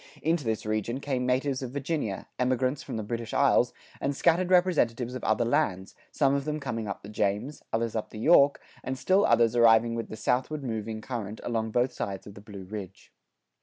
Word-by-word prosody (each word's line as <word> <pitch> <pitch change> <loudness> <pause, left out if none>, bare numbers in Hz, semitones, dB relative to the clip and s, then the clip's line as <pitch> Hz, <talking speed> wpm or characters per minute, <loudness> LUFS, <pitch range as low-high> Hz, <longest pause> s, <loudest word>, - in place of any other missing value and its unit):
[93:3] - - -21
Into 160 -1 +1
this 110 -1 -2
region 110 +4 -1
came 130 -3 -2
natives 130 +1 0
of 130 - -4
Virginia, 140 - -3
emigrants 130 +2 +1
from - - -6
the 110 - -3
British 115 +2 -4
isles, - - +4 0.3
and 140 0 -1
scattered 175 +4 +2
representatives 140 -10 +2
of 130 - -6
other 110 +2 +2
lands, 110 -8 0 0.2
some 140 -2 +2
of 140 0 0
them 150 +1 -3
coming 115 -6 -4
up 100 - -5
the - - -9
James, 105 +7 -2
others 115 0 -1
up 110 - -3
the - - -10
York, 140 +3 +5 0.2
and 130 0 -3
still 190 +8 +3
others 115 0 +4
arriving 115 0 +5
with 115 0 -4
the 110 - -7
southward 130 +6 -1
moving 110 -2 -4
current 110 -4 -5
along 110 -2 -1
both 125 +3 +1
sides 100 -1 -4
of 100 - -10
the 105 - -12
Blue 100 -2 -9
Ridge. 95 -1 -9
120 Hz, 205 wpm, -28 LUFS, 110-140 Hz, 0.3 s, York